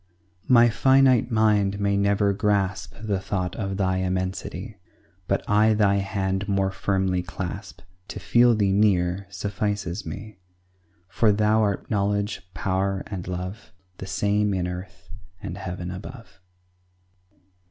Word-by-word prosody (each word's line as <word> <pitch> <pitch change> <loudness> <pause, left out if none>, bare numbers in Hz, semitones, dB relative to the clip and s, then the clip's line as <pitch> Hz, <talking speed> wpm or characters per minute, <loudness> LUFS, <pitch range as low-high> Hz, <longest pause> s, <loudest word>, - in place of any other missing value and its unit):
My 120 -2 +7
finite 130 +1 +4
mind 105 -3 +2
may 100 0 +1
never 100 0 +2
grasp 95 -5 -1
The 105 -3 -1
thought 95 -2 -3
of 95 -3 -3
Thy 95 -2 +1
immensity; 95 0 -3 0.5
But 100 - -1
I 105 +1 +4
Thy 100 -2 +3
hand 95 0 -2
more 95 -1 +1
firmly 95 -1 0
clasp 90 +1 -7 0.3
To - - -7
feel 120 +7 +4
Thee 100 -2 +2
near 95 -2 +2
suffices 100 -2 -3
me; 105 -2 -8 0.7
For 105 +3 +2
Thou 105 +2 +3
art 100 -2 -1
knowledge, 100 0 0
power, 95 +3 -1
and 95 -4 -6
love, 90 0 -6 0.3
The 95 - -6
same 105 +1 +1
in 90 -1 -1
earth 90 -1 -8 0.3
and 85 - -6
heaven 90 -1 -5
above. 105 +1 -10
100 Hz, 130 wpm, -24 LUFS, 95-105 Hz, 0.7 s, My